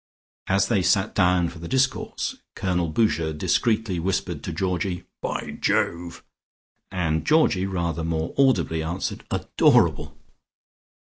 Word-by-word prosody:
As 95 +1 +2
they 105 -5 +2
sat 95 +2 +2
down 90 -3 +3
for 85 - -11
the 85 - -7
discourse, 130 +2 -1 0.2
Colonel 90 -3 0
Boucher 80 -4 +1
discreetly 105 +4 0
whispered 95 +2 -2
to - - -4
Georgie 90 -1 -2 0.2
"By - - -4
Jove." 85 0 -1 0.7
And 80 -4 -1
Georgie 155 -12 +3
rather 85 -4 -2
more 80 0 -2
audibly 100 -12 +2
answered 85 +4 -4
"Adorable." - - +2
90 Hz, 120 wpm, -24 LUFS, 85-100 Hz, 0.7 s, down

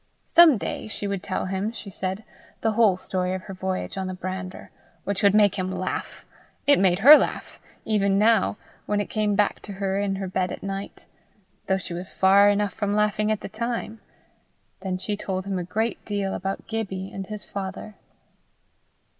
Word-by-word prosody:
Some 335 -6 +7
day - - -4
she 215 - -4
would 200 -2 -2
tell 160 - -3
him, 190 +3 -2
she 220 -3 -8
said, 190 +3 -4 0.4
the 225 - +2
whole 215 -4 +4
story 185 0 -2
of 185 - -6
her 195 - -8
voyage 190 +1 -3
on 190 - -2
the 185 - -4
brander, 185 0 -6 0.3
which 200 -1 -2
would 200 0 +5
make 205 -2 +4
him 185 0 -2
laugh; 185 0 -4 0.4
it 285 - +5
made 185 -2 +4
her 275 +10 +10
laugh, - - -4 0.3
even 200 -2 +2
now, 215 -1 +3 0.3
when 210 0 +1
it 205 - -3
came 210 -2 +1
back 205 0 +1
to 205 - -9
her 195 0 -1
in 200 -1 0
her 195 0 -4
bed 185 0 -1
at - - -7
night, 195 0 -6 0.6
though 190 - +2
she 180 -2 -7
was 180 +2 -6
far 200 +2 +5
enough 205 0 +1
from 205 -2 -1
laughing 210 0 +1
at 215 - -1
the - - -5
time. 225 +1 -4 0.8
Then 190 -1 -3
she 205 +3 -2
told 190 -2 -4
him 195 -2 -2
a - - -3
great 220 +6 -2
deal 200 -2 -2
about 195 +1 -4
Gibbie 195 -4 -4
and 195 -1 -6
his 210 -2 -6
father. 200 +2 -6
195 Hz, 190 wpm, -25 LUFS, 190-210 Hz, 0.8 s, her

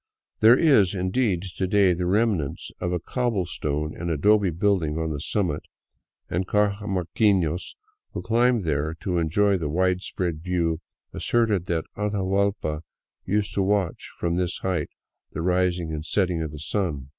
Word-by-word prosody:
There 115 +3 +7
is, 110 - +4
indeed, 95 0 0
to 95 - 0
day 100 -2 +4
the 90 +1 -2
remnants 100 -7 0
of 90 - -2
a 90 - 0
cobble 115 -1 -1
stone 75 -3 -3
and 85 0 -4
adobe 100 +5 +3
building 85 -3 +1
on 80 -1 -1
the 75 - -3
summit, 85 -5 -1 0.7
and 90 +2 -2
cajamarquinos 100 -3 +1 0.4
who - - -4
climb 120 -1 +2
there 75 0 -1
to 90 -3 0
enjoy 95 +5 +2
the 75 -3 -2
widespread 90 -1 -1
view 85 -2 0 0.3
asserted 110 -6 +1
that 80 -2 -1
Atahuallpa 100 -5 0 0.4
used 100 +1 0
to 100 - +1
watch 95 -3 0
from 85 0 -1
this 90 -1 -1
height 90 -6 -1 0.4
the 80 - -3
rising 90 -2 +1
and 75 0 -4
setting 90 -1 0
of 80 - -3
the 75 - -9
sun. 75 -5 -2
90 Hz, 150 wpm, -25 LUFS, 80-100 Hz, 0.7 s, There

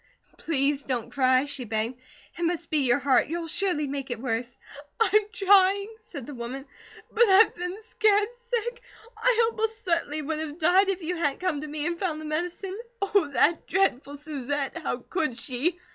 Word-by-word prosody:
"Please 285 -2 0
don't 250 -4 -3
cry," 260 0 +3
she 280 -2 -4
begged. 225 +3 -3 0.3
"It - - -8
must 340 0 -1
be 310 - +3
your 255 -2 +3
heart; 270 -2 +3
you'll 335 +2 -3
surely 345 -2 0
make 275 -1 -4
it 240 -2 -3
worse." 240 0 -3 0.4
"I'm 425 -1 +5
trying," 400 0 +4
said 285 - -9
the 290 - -8
woman, 255 +2 -6 0.5
"but 455 - -1
I've 390 +4 +6
been 360 +3 -5
scared 430 0 +2
sick. 480 0 -4 0.3
I 460 0 +3
most 445 0 -3
certainly 320 -4 0
would 310 +1 -2
have 310 -1 -5
died 360 +4 +4
if 380 -2 -2
you 350 +2 -2
hadn't 290 -4 0
come 350 -6 -1
to 305 - -6
me 300 0 -4
and 340 0 -2
found 335 -6 -2
the 310 - -7
medicine. 355 +5 -3 0.2
Oh, 395 -5 +2
that 325 +5 +2
dreadful 290 -7 0
Susette! 290 +1 -3
How 305 - -2
could 305 -9 -1
she?" 285 +8 -2
325 Hz, 180 wpm, -26 LUFS, 275-390 Hz, 0.5 s, I've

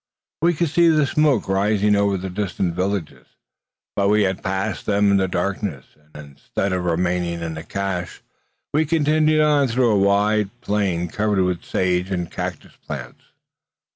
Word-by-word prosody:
We 170 +1 +3
could 170 +1 0
see 170 +3 +4
the 155 -3 +4
smoke 145 -4 +2
rising 105 +2 +2
over 100 -1 +2
the 95 0 -5
distant 95 -2 -2
villages; 90 -8 -3 0.7
but 100 0 +2
we 105 0 +4
had 95 -1 -1
passed 95 +3 -3
them 100 -1 +3
in 100 - +4
the 95 -1 +1
darkness, 90 -5 -3 0.3
and 75 -1 -10
instead 95 +7 -3
of 90 -1 -2
remaining 85 0 -1
in 80 -1 -4
cache, 95 -3 -4 0.5
we 155 +2 +3
continued 155 0 +3
on 150 -2 +3
through 120 0 +2
a 105 - +3
wide 100 +1 +2
plain 95 -6 -1
covered 105 +1 0
with 90 -1 -1
sage 90 0 0
and 90 -3 -3
cactus - - -6
plants. 65 -3 -8
100 Hz, 160 wpm, -21 LUFS, 90-110 Hz, 0.7 s, see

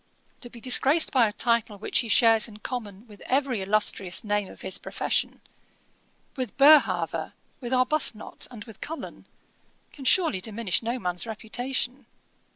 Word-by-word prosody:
To 240 - -5
be 235 - -12
disgraced 270 +6 +4
by 250 -5 +4
a - - -3
title 230 -1 0
which 205 - -1
he 235 - -1
shares 225 -1 +4
in 215 -2 -12
common 215 -3 -7
with 205 -2 -15
every 260 -5 0
illustrious 195 -2 0
name 205 -2 -1
of - - -14
his 190 - -2
profession, - - -2 0.9
with 255 -6 -5
Boerhaave, 190 - +4 0.3
with 245 -2 -6
Arbuthnot, 255 -3 -1
and 230 -4 -10
with 220 -2 -14
Cullen, 320 +2 -8 0.7
can 280 - -11
surely 310 - +3
diminish 210 -1 -1
no 235 +2 -2
man's 180 -1 -3
reputation. 245 +4 -3
230 Hz, 150 wpm, -26 LUFS, 205-255 Hz, 0.9 s, disgraced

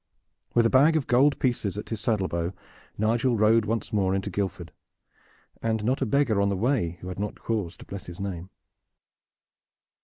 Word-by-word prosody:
With 120 -1 +5
a - - +4
bag 145 +5 +5
of 155 -4 +1
gold 135 +4 +4
pieces 115 -6 -1
at 105 - -6
his 110 -2 -3
saddle 110 -6 +1
bow 85 +1 -2 0.4
Nigel 115 +3 +1
rode 110 +1 +4
once 115 +1 -2
more 95 -2 +2
into 95 - -2
Guildford, 95 -4 -3 0.9
and 110 -1 -1
not 130 +5 0
a 130 - +1
beggar 120 -5 +2
on 100 - +2
the 100 - -1
way 105 -7 0
who 90 - -7
had 90 - -6
not 105 0 -4
cause 105 -7 -3
to - - -12
bless 100 -2 -8
his 85 0 -9
name. 95 -2 -5
105 Hz, 185 wpm, -26 LUFS, 95-120 Hz, 0.9 s, With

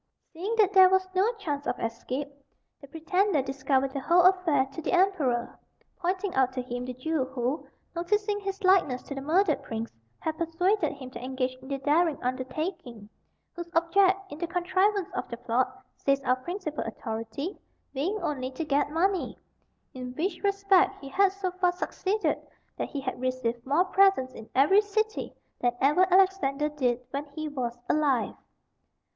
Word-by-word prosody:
Seeing 385 +8 -3
that 405 -3 +4
there 375 -1 +8
was 380 0 +2
no 385 +5 +3
chance 295 -10 -4
of 245 - -1
escape, 250 +5 -3 0.5
the 280 - -11
pretender 325 +2 +1
discovered 270 0 0
the 275 - -2
whole 345 +6 +4
affair 360 -7 +4
to 325 - -5
the - - -2
emperor, 320 -11 +1 0.4
pointing 370 +2 -1
out 260 -1 +3
to 255 - -2
him 245 0 -5
the 255 - -5
Jew 280 +2 -1
who, 260 +2 -3 0.3
noticing 410 +4 0
his 390 0 -5
likeness 365 -9 +3
to - - -7
the 275 - -5
murdered 320 +2 +2
prince, 225 0 -5 0.3
had 315 +1 -4
persuaded 355 +5 +1
him 260 -3 -10
to 250 - -8
engage 255 0 -2
in 260 +1 -14
the 275 0 -2
daring 300 +3 +2
undertaking; 255 - -4 0.5
whose 345 0 -6
object 370 +3 +4
in 290 - -8
the 345 - -2
contrivance 370 +2 +1
of - - -3
the 235 - -5
plot, 245 +1 -1
says 275 0 +2
our 255 -1 +2
principal 320 +2 -4
authority, 225 - -5 0.3
being 345 +11 -1
only 260 -5 -2
to 265 +5 -5
get 290 0 +1
money, 365 +4 0 0.6
in 250 -1 -7
which 340 +2 -2
respect 395 -1 +3
he 275 - -9
had 390 +6 +3
so 385 -1 -3
far 365 0 +1
succeeded 390 +3 -1 0.4
that - - -3
"he 285 - -4
had 255 -2 -4
received 255 -2 -2
more 310 +7 +3
presents 380 -9 +3
in 225 - -11
every 300 +10 +6
city 435 +1 -2 0.3
than 245 -1 +1
ever 355 +7 +4
Alexander 350 -7 +3
did 255 -5 0
when 280 +1 -3
he 310 0 -3
was 250 -5 -3
alive." 285 -6 +1
305 Hz, 170 wpm, -28 LUFS, 260-375 Hz, 0.6 s, there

